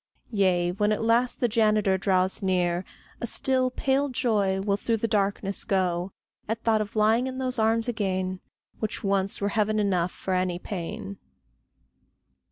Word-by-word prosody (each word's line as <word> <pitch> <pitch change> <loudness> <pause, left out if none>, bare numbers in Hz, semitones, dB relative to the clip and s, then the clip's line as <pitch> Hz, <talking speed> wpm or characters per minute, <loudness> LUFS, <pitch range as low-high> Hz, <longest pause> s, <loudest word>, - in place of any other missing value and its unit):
Yea, 185 -4 +2
when 210 +3 +1
at 215 - 0
last 235 +2 +2
the 245 - +4
janitor 215 -3 +2
draws 190 0 +1
near, 180 -2 +1 0.4
A 235 - -1
still, 255 +2 +1
pale 270 +2 0
joy 210 -7 +1
will 200 0 +1
through 225 +3 -1
the 230 - -1
darkness 200 -2 0
go, 180 -1 0 0.4
At 225 +1 -2
thought 220 -2 +3
of 210 +1 -6
lying 220 +4 +3
in 260 0 -5
those 255 -2 -2
arms 225 +1 +2
again, 190 -5 -1 0.4
Which 215 +1 -3
once 195 -1 0
were 200 - 0
heaven 215 +1 +1
enough 185 -4 +1
for 190 - -4
any 185 -1 0
pain. 165 - -6
205 Hz, 160 wpm, -26 LUFS, 190-230 Hz, 0.4 s, the